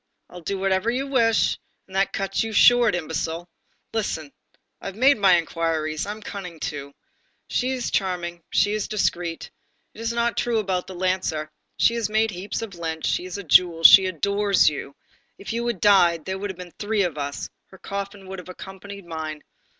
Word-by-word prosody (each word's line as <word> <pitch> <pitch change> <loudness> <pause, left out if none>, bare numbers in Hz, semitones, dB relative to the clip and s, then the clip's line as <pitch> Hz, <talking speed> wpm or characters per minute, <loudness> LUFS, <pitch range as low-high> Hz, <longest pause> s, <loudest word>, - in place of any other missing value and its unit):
I'll 180 - -10
do 195 +4 -3
whatever 190 +3 +1
you 255 +3 -1
wish, 230 -5 +2 0.3
and 190 - -13
that 195 0 +2
cuts 195 0 -1
you 225 -1 -5
short, 240 -1 +6
imbecile! 165 +1 -3 0.5
Listen. 160 -9 -3 0.5
I - - -6
have 195 - -6
made 260 +2 +4
my 190 -3 +6
inquiries, 165 -1 -2
I'm 210 +1 -6
cunning 180 -6 -7
too; 140 -2 -5 0.5
she 255 - 0
is 250 -2 -3
charming, 175 -3 -2
she 205 +3 +2
is 215 -1 -2
discreet, 175 -5 -2 0.4
it 225 - -11
is 230 0 -1
not 235 0 0
true 240 -1 +1
about 190 -4 -1
the 190 - -8
lancer, 175 -4 -1 0.3
she 230 - +4
has 230 -3 -1
made 220 +1 +2
heaps 195 +4 -4
of 215 -3 -7
lint, 160 -2 -4
she's 185 +1 -1
a 200 - -6
jewel, 165 0 +4
she 190 +3 +10
adores 200 +2 +2
you, 140 -1 -7 0.4
if 200 - -6
you 235 +1 -2
had 235 -6 -2
died, 175 -5 +4
there 190 0 -3
would 205 +1 -4
have 190 - -6
been 180 -1 -10
three 210 -1 +1
of 165 -5 -3
us, 140 0 -4 0.2
her 190 - -16
coffin 200 0 -6
would 190 0 -6
have 180 - -11
accompanied 195 +1 -10
mine. 155 -2 -6
190 Hz, 190 wpm, -24 LUFS, 170-210 Hz, 0.5 s, she